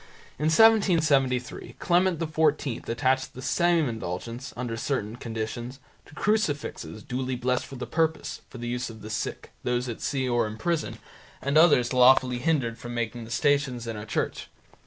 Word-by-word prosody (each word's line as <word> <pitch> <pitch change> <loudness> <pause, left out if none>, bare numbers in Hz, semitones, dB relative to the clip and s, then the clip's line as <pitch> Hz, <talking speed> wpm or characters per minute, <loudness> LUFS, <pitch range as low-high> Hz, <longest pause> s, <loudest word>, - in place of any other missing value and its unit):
In 150 - -1
1773 155 - +3
Clement 180 0 +2
XIV 155 -5 0
attached 130 +2 0
the 130 - -7
same 170 +2 +2
indulgence, 115 +3 -5
under 120 -2 -3
certain 115 -3 -2
conditions, 120 +2 -5 0.3
to - - -15
crucifixes 145 - -1
duly 130 +1 -3
blessed 125 +1 -1
for 135 - -9
the 125 - -5
purpose, 160 0 -1
for - - -10
the 120 0 -5
use 125 +1 -2
of 110 -2 -11
the 110 - -7
sick, 110 - -4
those 125 +1 0
at 115 - -6
sea 130 -2 -1
or 120 -2 +1
in 105 +1 -7
prison, 165 +4 -1 0.4
and 140 +1 -2
others 145 -7 +5
lawfully 125 0 +5
hindered 130 -5 0
from 120 0 -7
making 120 0 -3
the - - -12
Stations 140 -3 +1
in 115 -1 -4
a 105 - -6
church. - - -2
125 Hz, 165 wpm, -26 LUFS, 120-150 Hz, 0.4 s, others